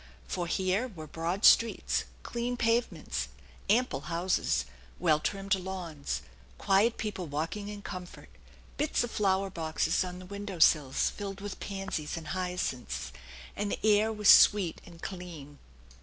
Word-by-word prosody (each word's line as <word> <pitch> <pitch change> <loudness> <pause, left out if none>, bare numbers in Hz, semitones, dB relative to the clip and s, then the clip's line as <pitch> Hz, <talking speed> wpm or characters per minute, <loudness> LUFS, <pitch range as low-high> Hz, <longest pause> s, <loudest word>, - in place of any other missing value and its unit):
For 175 - -2
here 190 +7 +1
were 170 -10 -9
broad 165 +6 -2
streets, 230 -1 +4 0.2
clean 240 +1 -3
pavements, 235 0 0 0.4
ample 245 +5 +3
houses, 175 - 0 0.3
well 150 - +3
trimmed 195 +4 -1
lawns, 180 - -3 0.3
quiet 200 +4 +3
people 200 -5 -4
walking 160 +8 -3
in 205 -1 -7
comfort, 180 -1 -8 0.5
bits 300 -3 +1
of 240 - -4
flower 195 -1 +1
boxes 160 0 0
on 180 -1 -6
the 185 - -10
window 200 0 -6
sills 150 -4 +4
filled 195 -1 -6
with 205 0 -6
pansies 195 -6 -4
and 160 -1 -7
hyacinths; 155 - -3 0.4
and 205 0 -2
the - - -2
air 215 +1 +4
was 210 -2 -1
sweet 200 -6 +7
and 170 -1 -14
clean. 165 -6 -8
190 Hz, 140 wpm, -30 LUFS, 165-205 Hz, 0.5 s, sweet